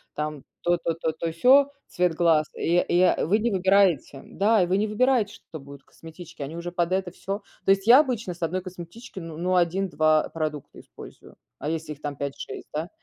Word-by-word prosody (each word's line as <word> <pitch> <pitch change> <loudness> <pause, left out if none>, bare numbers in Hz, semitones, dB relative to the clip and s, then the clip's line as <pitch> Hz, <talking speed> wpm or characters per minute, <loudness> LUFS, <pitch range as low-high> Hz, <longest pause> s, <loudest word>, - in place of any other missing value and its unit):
там 150 -2 -4 0.2
то-то-то, 165 -2 0
то-сё, 210 - +3 0.2
цвет 175 -2 0
глаз. 160 -3 +3
И 170 +1 +1
и, 175 - +2
а, - - +2
вы 205 +5 +3
не 230 +2 0
выбираете 190 -7 +2
да, 210 0 +2
и - - +2
вы 185 +2 +1
не 215 +1 0
выбираете, 225 -1 +1
что 165 -7 -11
будет 140 0 -12
в - - -44
косметичке. 165 -1 -11
Они 150 +4 -7
уже 175 +1 -5
под 175 0 -1
это 190 -1 -1
всё 195 +4 -5 0.2
то 195 - +4
есть, 195 0 +2
я 245 +5 +8
обычно 235 -10 -1
с 170 - -18
1 175 +3 -1
косметички, 185 +5 -10
ну 165 -2 -8
ну, 180 +2 0
1-2 170 -3 +2
продукта 155 -3 -5
использую. - - -14 0.2
А 150 - -3
если 160 -1 -4
их 145 - -19
там 145 -1 -4
5-6 140 0 -6
да? 155 +3 -3
175 Hz, 200 wpm, -25 LUFS, 160-195 Hz, 0.2 s, я